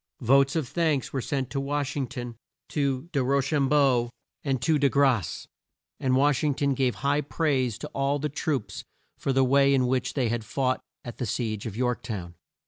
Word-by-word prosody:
Votes 135 Hz, +4 st, +4 dB
of 155 Hz, -6 st, 0 dB
thanks 155 Hz, -2 st, 0 dB
were 135 Hz, -, -1 dB
sent 135 Hz, -1 st, -2 dB
to 135 Hz, -, -1 dB
Wash 145 Hz, +1 st, -2 dB
ing 135 Hz, -3 st, -1 dB
ton, 120 Hz, -1 st, -6 dB, 0.3 s
to 140 Hz, 0 st, -1 dB
De 140 Hz, -4 st, +1 dB
Ro 140 Hz, +2 st, +2 dB
cham 140 Hz, 0 st, +1 dB
beau 135 Hz, -5 st, +3 dB, 0.3 s
and 135 Hz, -3 st, 0 dB
De 145 Hz, 0 st, +2 dB
Grasse, 130 Hz, -, +1 dB, 0.5 s
and 130 Hz, -1 st, +1 dB
Wash 140 Hz, +1 st, +3 dB
ing 145 Hz, -3 st, +1 dB
ton 140 Hz, 0 st, +1 dB
gave 130 Hz, -2 st, +1 dB
high 145 Hz, +1 st, +3 dB
praise 135 Hz, -7 st, 0 dB
to -, -, -6 dB
all 140 Hz, +1 st, 0 dB
the 150 Hz, +1 st, -2 dB
troops 135 Hz, -, -3 dB, 0.4 s
for 135 Hz, -, -1 dB
the 135 Hz, 0 st, +3 dB
way 140 Hz, +1 st, +4 dB
in 130 Hz, -1 st, +2 dB
which 125 Hz, 0 st, -1 dB
they 130 Hz, -4 st, +1 dB
had 115 Hz, 0 st, -1 dB
fought 130 Hz, +3 st, -1 dB, 0.2 s
at 120 Hz, -, -8 dB
the 125 Hz, -, -2 dB
siege 110 Hz, -3 st, -2 dB
of 110 Hz, -1 st, -7 dB
York 125 Hz, -1 st, 0 dB
town. 100 Hz, -8 st, -6 dB
135 Hz, 200 wpm, -26 LUFS, 125-140 Hz, 0.5 s, Votes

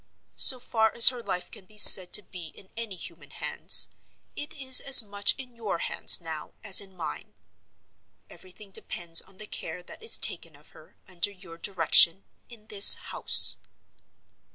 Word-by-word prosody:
So 255 Hz, -, +4 dB
far 220 Hz, -2 st, -5 dB
as 235 Hz, -, +6 dB
her 250 Hz, -2 st, -12 dB
life 180 Hz, -5 st, -9 dB
can 190 Hz, -, -15 dB
be 215 Hz, -, -17 dB
said 185 Hz, -3 st, +7 dB
to 210 Hz, -, +3 dB
be 175 Hz, -2 st, -14 dB
in 190 Hz, -, -21 dB
any 225 Hz, -4 st, -10 dB
human 175 Hz, -, -16 dB
hands, -, -, 0 dB, 0.5 s
it 295 Hz, -, -8 dB
is 260 Hz, -3 st, +2 dB
as 265 Hz, -3 st, +4 dB
much 205 Hz, -1 st, -4 dB
in 255 Hz, -2 st, -15 dB
your 225 Hz, -6 st, -9 dB
hands -, -, +2 dB
now 160 Hz, -3 st, -12 dB
as 200 Hz, -3 st, +2 dB
in 190 Hz, -2 st, -18 dB
mine. 75 Hz, -, -12 dB, 0.9 s
Everything 190 Hz, +2 st, -16 dB
depends 170 Hz, -3 st, -2 dB
on 190 Hz, -, -23 dB
the 215 Hz, -, -13 dB
care 180 Hz, -3 st, -11 dB
that -, -, -15 dB
is 450 Hz, -, -2 dB
taken -, -, -2 dB
of -, -, -22 dB
her, -, -, -24 dB
under 180 Hz, +1 st, -6 dB
your 185 Hz, -4 st, -19 dB
direction, 175 Hz, 0 st, +1 dB, 0.3 s
in 230 Hz, -3 st, -19 dB
this 205 Hz, -2 st, +5 dB
house." -, -, 0 dB
200 Hz, 170 wpm, -22 LUFS, 180-225 Hz, 0.9 s, said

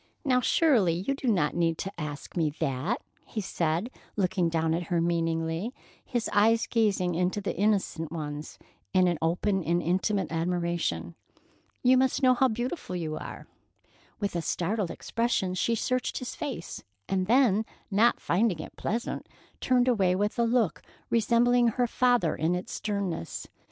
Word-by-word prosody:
"Now, 250 Hz, -2 st, +3 dB
surely, 245 Hz, -, +3 dB
you 190 Hz, +10 st, -1 dB
do 275 Hz, -1 st, -5 dB
not 180 Hz, -10 st, +2 dB
need 165 Hz, -1 st, +1 dB
to 195 Hz, -, -5 dB
ask 150 Hz, -2 st, -6 dB
me 165 Hz, -3 st, +2 dB
that," 145 Hz, -, -1 dB, 0.2 s
he 220 Hz, -, -5 dB
said, 175 Hz, +2 st, -1 dB, 0.2 s
looking 185 Hz, -3 st, +1 dB
down 160 Hz, -1 st, +1 dB
at 170 Hz, +1 st, -1 dB
her 175 Hz, -2 st, +1 dB
meaningly, 165 Hz, +5 st, -1 dB, 0.3 s
his 240 Hz, -3 st, -2 dB
eyes 225 Hz, +3 st, +4 dB
gazing 200 Hz, -6 st, +1 dB
into 180 Hz, +4 st, 0 dB
the 200 Hz, -, -3 dB
innocent 195 Hz, -5 st, 0 dB
ones 150 Hz, -2 st, -5 dB, 0.4 s
in 180 Hz, -2 st, +4 dB
open 180 Hz, +4 st, +1 dB
and 170 Hz, +3 st, +1 dB
intimate 190 Hz, +3 st, 0 dB
admiration. 170 Hz, -, -1 dB, 0.7 s
"You 255 Hz, +1 st, +6 dB
must 260 Hz, +1 st, +1 dB
know 255 Hz, -1 st, +7 dB
how 260 Hz, +1 st, +3 dB
beautiful 240 Hz, -, -3 dB
you 160 Hz, -3 st, -3 dB
are!" -, -, -7 dB, 0.7 s
With 200 Hz, -4 st, -2 dB
a 170 Hz, -, 0 dB
startled 185 Hz, +4 st, -1 dB
expression, 215 Hz, 0 st, -1 dB
she 230 Hz, +5 st, +1 dB
searched 255 Hz, +3 st, -1 dB
his 255 Hz, -, -5 dB
face, 265 Hz, -, -5 dB, 0.2 s
and 185 Hz, -1 st, 0 dB
then, 225 Hz, -3 st, +4 dB, 0.3 s
not 225 Hz, +5 st, +4 dB
finding 190 Hz, +1 st, +1 dB
it -, -, -8 dB
pleasant, 230 Hz, +3 st, -3 dB, 0.3 s
turned 255 Hz, -1 st, +2 dB
away 195 Hz, -7 st, +3 dB
with 205 Hz, +4 st, -1 dB
a -, -, +4 dB
look 230 Hz, -5 st, +1 dB, 0.3 s
resembling 235 Hz, +2 st, +4 dB
her 245 Hz, +2 st, +1 dB
father 245 Hz, -8 st, +2 dB
in 165 Hz, +3 st, +1 dB
its 180 Hz, -, -5 dB
sternness. 200 Hz, -, -3 dB
190 Hz, 155 wpm, -28 LUFS, 170-235 Hz, 0.7 s, know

